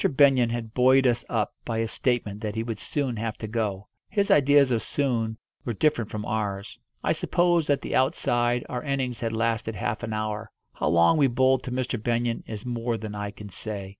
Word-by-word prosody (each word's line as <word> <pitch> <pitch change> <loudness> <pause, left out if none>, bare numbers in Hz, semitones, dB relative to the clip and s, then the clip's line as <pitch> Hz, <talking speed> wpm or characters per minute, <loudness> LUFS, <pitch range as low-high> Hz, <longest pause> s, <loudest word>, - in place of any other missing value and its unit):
Benyon 135 -4 +4
had 115 -1 -4
buoyed 130 +1 +5
us 120 -1 +2
up 110 -3 0
by 115 - -3
his 115 0 -1
statement 110 -5 -1
that 105 -1 -3
he 110 - -1
would 115 -3 -4
soon 135 -2 -2
have 110 0 -3
to - - -6
go. 105 -3 -2 0.2
His 200 -1 +1
ideas 145 -1 +5
of 115 -2 +1
soon 115 -4 -1 0.3
were 120 - -2
different 120 -3 +1
from 105 -1 -5
ours. 100 -2 -3 0.2
I - - +2
suppose, 175 -3 +2
at 145 - +2
the - - -3
outside, 120 -2 +1
our 125 - -3
innings 135 -4 -2
had 115 -1 -1
lasted 115 -1 -1
half 120 -1 -2
an 120 -2 -4
hour. 110 0 -3 0.2
How - - -2
long 85 - +5
we 140 -3 +5
bowled 130 +1 +3
to 125 - -4
Mr. 125 -2 -2
Benyon 120 0 0
is 110 0 -6
more 120 -1 -2
than 110 -1 -6
I 105 0 -4
can 105 0 -10
say. 100 0 -5
115 Hz, 205 wpm, -26 LUFS, 110-130 Hz, 0.3 s, buoyed